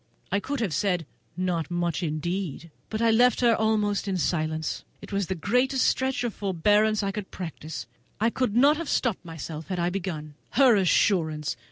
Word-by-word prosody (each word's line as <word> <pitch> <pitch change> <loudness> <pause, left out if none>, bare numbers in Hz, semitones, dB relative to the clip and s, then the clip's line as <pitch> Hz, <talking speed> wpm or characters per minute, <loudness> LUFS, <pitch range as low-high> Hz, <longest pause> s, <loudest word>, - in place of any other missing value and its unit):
I 200 - +2
could 275 +4 -3
have 195 -8 -1
said, 180 -1 0 0.3
"Not 180 -3 -1
much, 175 -1 -1
indeed!" 170 0 -3 0.2
but 220 +1 -2
I 230 - +5
left 245 +3 +4
her 235 -2 +5
almost 210 -2 +1
in 190 -1 0
silence. 155 -2 -1 0.2
It - - -11
was 200 -2 0
the 190 - -2
greatest 250 - +1
stretch 260 -1 +1
of 235 -3 -2
forbearance 210 +3 +2
I 200 - 0
could 200 -1 -6
practise. 160 -3 -6 0.3
I 225 +2 +2
could 250 -4 -1
not 285 +5 +5
have 335 -2 -4
stopped 235 -8 0
myself 160 -2 -7
had 185 - -3
I 175 0 0
begun. 170 -6 -4 0.2
Her 255 -3 +6
assurance! 165 -5 +2
195 Hz, 180 wpm, -26 LUFS, 170-225 Hz, 0.3 s, Her